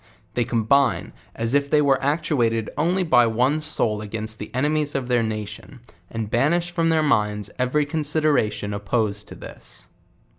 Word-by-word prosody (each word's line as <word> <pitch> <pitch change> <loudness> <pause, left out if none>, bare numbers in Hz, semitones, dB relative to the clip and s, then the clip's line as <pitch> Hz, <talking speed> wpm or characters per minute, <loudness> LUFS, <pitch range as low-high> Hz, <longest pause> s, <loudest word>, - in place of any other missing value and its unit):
They 120 - 0
combine, 125 +3 +1 0.2
as 115 +2 -1
if 140 0 +2
they 150 - +4
were 140 -2 +3
actuated 135 -7 0
only 175 +6 +1
by 125 -8 +4
one 125 +7 +1
soul 115 -8 -1
against 110 +1 -5
the - - -6
ex.ernies 150 +3 0
of 130 -2 -2
their 120 -1 +3
na; 110 -1 -2
ion, 135 - -15 0.3
and 115 -1 -4
banish 170 +10 +1
from 165 -1 +1
their 160 -1 +3
minds 105 -7 0
every 130 +4 +1
consideration 145 -9 0
opposed 105 0 -1
to - - -10
this. - - -11
125 Hz, 160 wpm, -23 LUFS, 110-150 Hz, 0.3 s, they